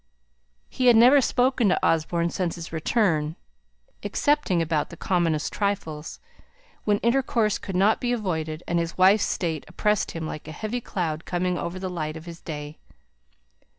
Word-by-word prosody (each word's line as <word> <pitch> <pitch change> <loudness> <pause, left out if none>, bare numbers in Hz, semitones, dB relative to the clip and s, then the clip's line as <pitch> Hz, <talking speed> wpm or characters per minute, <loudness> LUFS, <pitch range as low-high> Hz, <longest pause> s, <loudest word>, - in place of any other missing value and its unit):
He 255 - 0
had 240 - +8
never 250 +5 +7
spoken 250 -2 +2
to 185 - +1
Osborne 170 +1 +1
since 180 -3 -2
his 170 -1 -8
return, 160 -3 +1 0.7
excepting 290 - +1
about 160 -2 0
the 170 - -11
commonest 165 -5 0
trifles, 165 -7 -3 0.7
when 205 -1 +3
intercourse 235 -3 +1
could 190 - -6
not 200 +4 +3
be 245 - 0
avoided; 165 -8 -2
and 170 0 +1
his 170 0 -3
wife's 195 +3 +5
state 160 -5 -2
oppressed 210 -1 0
him 165 -1 -4
like 155 -1 -7
a - - -6
heavy 220 +8 -4
cloud 165 -7 -3
coming 180 0 -1
over 170 +1 -4
the 185 0 -4
light 160 -3 -4
of 160 - -11
his 170 -1 -10
day. 150 -1 -7
175 Hz, 160 wpm, -25 LUFS, 160-210 Hz, 0.7 s, had